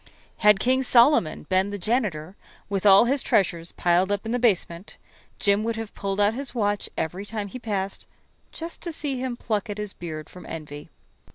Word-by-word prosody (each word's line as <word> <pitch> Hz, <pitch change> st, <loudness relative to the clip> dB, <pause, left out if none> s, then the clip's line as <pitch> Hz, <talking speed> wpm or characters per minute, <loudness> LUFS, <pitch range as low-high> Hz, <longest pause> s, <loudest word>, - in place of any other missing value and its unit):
Had 210 Hz, -2 st, +5 dB
King 260 Hz, +4 st, +2 dB
Solomon 245 Hz, -, +4 dB
been 185 Hz, +4 st, +1 dB
the 205 Hz, -, -4 dB
janitor, 195 Hz, -6 st, -1 dB, 0.3 s
with 200 Hz, 0 st, +1 dB
all 195 Hz, +3 st, +8 dB
his 270 Hz, +2 st, +2 dB
treasures 170 Hz, -3 st, +1 dB
piled 180 Hz, +3 st, +2 dB
up 205 Hz, +1 st, -1 dB
in 225 Hz, -, -3 dB
the 245 Hz, -, 0 dB
basement, 190 Hz, -5 st, 0 dB, 0.4 s
Jim 200 Hz, +1 st, +2 dB
would 230 Hz, 0 st, -1 dB
have 225 Hz, -1 st, -6 dB
pulled 195 Hz, 0 st, -3 dB
out 205 Hz, +1 st, +3 dB
his 265 Hz, +2 st, -4 dB
watch 205 Hz, -3 st, 0 dB
every 180 Hz, +5 st, -3 dB
time 205 Hz, -1 st, -5 dB
he 255 Hz, -, -7 dB
passed, 200 Hz, -4 st, -3 dB, 0.4 s
just 330 Hz, +1 st, -7 dB
to 340 Hz, -, -4 dB
see 290 Hz, -4 st, -4 dB
him 255 Hz, -2 st, -3 dB
pluck 215 Hz, -1 st, -2 dB
at 205 Hz, -, -4 dB
his 210 Hz, -2 st, -5 dB
beard 155 Hz, -3 st, -7 dB
from 180 Hz, -, -12 dB
envy. 150 Hz, -2 st, -8 dB
205 Hz, 190 wpm, -25 LUFS, 185-235 Hz, 0.4 s, all